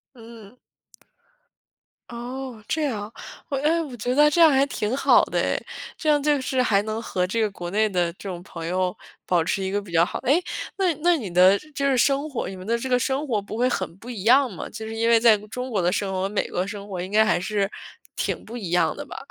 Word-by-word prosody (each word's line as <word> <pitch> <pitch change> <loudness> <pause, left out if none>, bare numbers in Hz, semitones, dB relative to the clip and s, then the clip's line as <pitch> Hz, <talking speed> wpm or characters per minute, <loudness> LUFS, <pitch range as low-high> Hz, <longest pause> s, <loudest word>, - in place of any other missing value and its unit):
嗯。 230 -1 -13 1.5
哦， 245 -1 -7
这 315 -1 0
样。 215 -6 -3 0.4
哦， 275 - -1
诶， 320 +4 +2
我 275 -6 -6
觉 245 +4 -1
得 300 +1 +6
这 340 - 0
样 325 -2 +8
还 275 0 +4
挺 230 -3 -2
好 - - +5
的 - - -2
诶， - - -1 0.3
这 310 - -1
样 295 -1 +4
就 295 -2 +3
是 260 0 0
还 205 -5 +3
能 220 +1 -3
和 180 -5 -1
这 225 +4 -1
个 210 -2 +1
国 175 -3 -6
内 215 +2 +2
的 175 -3 0
这 195 +1 -8
种 175 -1 -6
朋 165 -4 -8
友 180 +1 -1 0.3
保 175 -3 +2
持 195 +3 -1
一 190 - -2
个 205 +1 -1
比 190 -4 -13
较 165 +1 +4
好 - - -5
诶， 280 +8 +2 0.4
那 380 -2 +2
你 - - -15
那 350 -1 +4
你 210 -9 -5
的 185 +3 +6
就 - - -16
是 - - -19
就 280 0 -2
是 270 -2 +3
生 280 +4 +2
活 270 - -3
你 190 - -6
们 185 0 -10
的 230 +2 +1
这 260 - -4
个 250 -1 +3
生 270 +4 -1
活 215 -5 0
不 210 +2 -7
会 250 +1 +3
很 185 -7 -3
不 240 +5 -11
一 210 -6 -6
样 255 +3 +5
吗？ 180 - -7
就 220 0 -7
是 225 - -6
因 230 +1 +1
为 230 -1 +6
在 225 -2 +6
中 250 +4 -5
国 205 -5 0
的 175 +1 +2
生 195 0 -1
活 185 - -1
和 195 - -1
美 210 - -1
国 180 - -1
的 190 - -2
生 205 -1 -7
活 185 -3 -5
应 185 +2 -6
该 220 +1 +5
还 215 - +2
是 200 0 -1 0.5
挺 - - -3
不 230 - -9
一 200 -8 -5
样 175 - +2
的 - - -7
吧。 - - -9
225 Hz, 285 characters per minute, -24 LUFS, 195-265 Hz, 1.5 s, 样